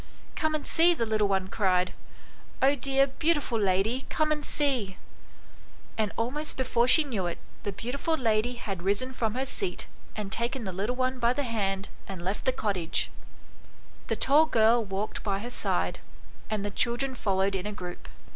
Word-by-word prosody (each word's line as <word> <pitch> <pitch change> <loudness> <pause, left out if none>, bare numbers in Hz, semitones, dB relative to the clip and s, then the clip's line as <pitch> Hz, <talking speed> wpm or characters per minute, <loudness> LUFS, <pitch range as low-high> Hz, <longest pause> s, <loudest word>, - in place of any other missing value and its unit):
"Come 315 -2 0
and 305 - -3
see," 345 +1 +4
the 230 - 0
little 215 -2 +2
one 190 -1 0
cried, 185 -3 +1 0.7
"oh, 270 +2 +5
dear 275 0 +2
beautiful 280 -3 0
lady, 200 +6 +1
come 310 -1 +1
and 300 -1 0
see! 255 -12 0 0.5
" - - -25
and 215 -2 0
almost 275 +7 -2
before 250 -2 +2
she 315 +5 +8
knew 220 -11 -2
it, 170 - -4 0.2
the 205 - -3
beautiful 265 - -2
lady 230 -1 +1
had 195 -6 -5
risen 205 +8 +1
from 225 -3 -1
her 260 +1 -1
seat 365 +7 0 0.3
and 210 -2 -4
taken 235 +3 -1
the 190 -3 -4
little 205 +7 -1
one 255 0 -1
by 235 0 +3
the 285 - -1
hand 200 -5 -1 0.2
and 185 -3 -7
left 195 +3 -2
the 260 - +4
cottage; 195 -9 -1 1.0
the - - 0
tall 305 +3 +4
girl 230 -2 +4
walked 195 +1 -3
by 200 -2 -1
her 235 +5 -6
side, - - -1 0.5
and 210 -2 -1
the 205 - -2
children 240 +5 0
followed 195 -4 0
in 190 +1 -2
a - - -3
group. 180 -3 -8
230 Hz, 180 wpm, -28 LUFS, 195-265 Hz, 1.0 s, she